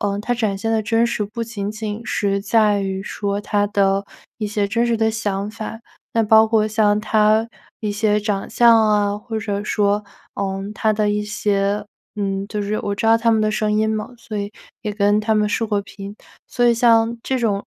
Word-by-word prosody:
呃， 200 Hz, -1 st, -1 dB
他 230 Hz, +4 st, -2 dB
展 220 Hz, -5 st, -1 dB
现 225 Hz, +3 st, -2 dB
的 220 Hz, -1 st, +1 dB
真 225 Hz, +2 st, +2 dB
实 225 Hz, -, -2 dB
不 220 Hz, +3 st, -5 dB
仅 205 Hz, -3 st, -4 dB
仅 215 Hz, 0 st, -5 dB
是 200 Hz, -1 st, 0 dB
在 210 Hz, -1 st, +2 dB
于 190 Hz, 0 st, -3 dB
说， 200 Hz, 0 st, -3 dB
他 205 Hz, -1 st, +1 dB
的 195 Hz, -1 st, +1 dB, 0.3 s
一 215 Hz, -, -2 dB
些 205 Hz, -1 st, -1 dB
真 230 Hz, +4 st, 0 dB
实 235 Hz, -, +1 dB
的 220 Hz, 0 st, +2 dB
想 205 Hz, -2 st, -2 dB
法， 220 Hz, 0 st, -7 dB, 0.4 s
那 230 Hz, -, +3 dB
包 220 Hz, +1 st, +6 dB
括 220 Hz, -1 st, +2 dB
像 215 Hz, -1 st, +2 dB
他 215 Hz, +1 st, +2 dB, 0.3 s
一 210 Hz, -2 st, -2 dB
些 210 Hz, 0 st, +1 dB
长 205 Hz, -2 st, -2 dB
相 235 Hz, 0 st, +5 dB
啊， 205 Hz, -1 st, +1 dB
或 220 Hz, +1 st, -5 dB
者 205 Hz, -1 st, -3 dB
说， 205 Hz, 0 st, +1 dB, 0.3 s
呃， 195 Hz, -1 st, -3 dB
他 220 Hz, -1 st, +1 dB
的 210 Hz, -1 st, +1 dB
一 210 Hz, 0 st, 0 dB
些 205 Hz, -1 st, 0 dB, 0.4 s
嗯， 195 Hz, -1 st, -1 dB
就 210 Hz, -, -3 dB
是 205 Hz, +1 st, -2 dB
我 205 Hz, -, -3 dB
知 225 Hz, -, -1 dB
道 225 Hz, -, +6 dB
他 230 Hz, 0 st, +2 dB
们 220 Hz, -, +3 dB
的 215 Hz, -, +2 dB
声 215 Hz, -1 st, 0 dB
音 215 Hz, +1 st, +2 dB
嘛， 215 Hz, -1 st, -2 dB
所 215 Hz, -2 st, -7 dB
以 200 Hz, 0 st, -3 dB, 0.3 s
也 210 Hz, -2 st, -3 dB
跟 205 Hz, 0 st, +2 dB
他 220 Hz, +1 st, +1 dB
们 210 Hz, 0 st, +2 dB
视 225 Hz, -, 0 dB
过 210 Hz, -2 st, 0 dB
频。 200 Hz, 0 st, -10 dB, 0.3 s
所 245 Hz, -1 st, +1 dB
以 235 Hz, -, +5 dB
像 230 Hz, 0 st, +3 dB
这 265 Hz, -, -1 dB
种， 205 Hz, -4 st, 0 dB
210 Hz, 225 characters per minute, -20 LUFS, 205-225 Hz, 0.4 s, 包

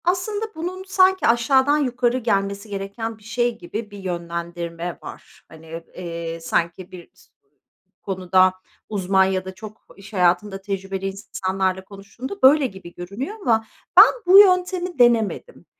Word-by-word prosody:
Aslında 380 Hz, +5 st, -1 dB
bunun 360 Hz, +4 st, -5 dB
sanki 375 Hz, 0 st, +3 dB
aşağıdan 265 Hz, +5 st, +3 dB
yukarı 250 Hz, -3 st, 0 dB
gelmesi 200 Hz, -3 st, -1 dB
gereken 200 Hz, +3 st, -5 dB
bir 215 Hz, -, -22 dB
şey 235 Hz, +1 st, -1 dB
gibi 210 Hz, +4 st, -7 dB
bir 205 Hz, -, -10 dB
yönlendirme 170 Hz, -1 st, -5 dB
var. -, -, -12 dB
Hani, 160 Hz, +1 st, -10 dB
eee, 170 Hz, -2 st, -6 dB
sanki 170 Hz, +3 st, -2 dB
bir 180 Hz, -2 st, -12 dB
s -, -, -23 dB, 0.8 s
konuda 185 Hz, -1 st, +2 dB, 0.4 s
uzman 190 Hz, -2 st, +2 dB
ya 190 Hz, -1 st, -1 dB
da 190 Hz, 0 st, -8 dB
çok 215 Hz, +3 st, -12 dB
iş 200 Hz, +2 st, -14 dB
hayatında 190 Hz, +2 st, +1 dB
tecrübeli 195 Hz, -1 st, -4 dB
is 195 Hz, +2 st, -8 dB
insanlarla 190 Hz, 0 st, -1 dB
konuştuğunda 210 Hz, -, -9 dB
böyle 275 Hz, +1 st, +6 dB
gibi 190 Hz, -5 st, -12 dB
görünüyor 205 Hz, -, -6 dB
ama 225 Hz, -8 st, +1 dB, 0.3 s
ben -, -, +9 dB
bu 380 Hz, +2 st, +9 dB
yöntemi 365 Hz, -4 st, +3 dB
denemedim. 240 Hz, -, +1 dB
200 Hz, 140 wpm, -22 LUFS, 185-255 Hz, 0.8 s, ben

